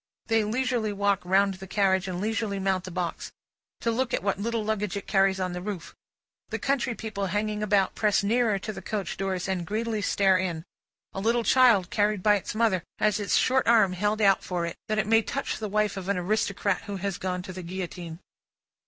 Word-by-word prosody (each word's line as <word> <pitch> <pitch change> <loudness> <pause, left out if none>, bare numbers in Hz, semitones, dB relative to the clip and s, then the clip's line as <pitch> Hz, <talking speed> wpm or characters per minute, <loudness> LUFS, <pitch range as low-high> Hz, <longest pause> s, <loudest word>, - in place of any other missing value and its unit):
They 225 -1 +2
leisurely 235 0 0
walk 200 -1 +1
round 195 +2 +3
the 190 +1 -10
carriage 190 -1 +1
and 180 -1 -3
leisurely 215 0 -1
mount 190 -1 0
the - - -6
box, 175 -1 -4 0.5
to 230 - +1
look 250 +2 0
at - - -4
what 200 -1 0
little 225 +1 -2
luggage 210 -2 -1
it 200 - -6
carries 195 -1 +2
on 185 -1 -2
the 180 - -5
roof; 190 -3 -6 0.6
the - - -2
country 265 -3 0
people 205 -3 -4
hanging 210 +2 -1
about, 205 -2 +2
press 210 -2 +2
nearer 225 0 +2
to 215 +3 -5
the - - -8
coach 205 -4 -3
doors 190 -2 -2
and 190 -2 -1
greedily 220 0 -2
stare 195 -2 +3
in; 170 -4 -2 0.5
a - - -4
little 230 +3 +1
child, 230 -8 +4
carried 205 -2 +1
by 210 - +5
its 205 0 -2
mother, 215 -5 +2 0.2
has 210 0 +2
its 205 - 0
short 260 +1 +2
arm 215 -5 +5
held 205 +4 0
out 195 -2 +4
for 175 -2 -2
it, 170 - -5
that 215 0 -1
it 215 - +1
may 225 +2 +4
touch 275 +5 -3
the 215 -1 -4
wife 210 0 +1
of 190 0 -5
an 200 - +1
aristocrat 200 +2 0
who 200 -1 -4
has 195 0 -3
gone 180 -1 -3
to 185 - -8
the 185 - -6
Guillotine. 175 -2 -6
200 Hz, 215 wpm, -27 LUFS, 190-215 Hz, 0.6 s, by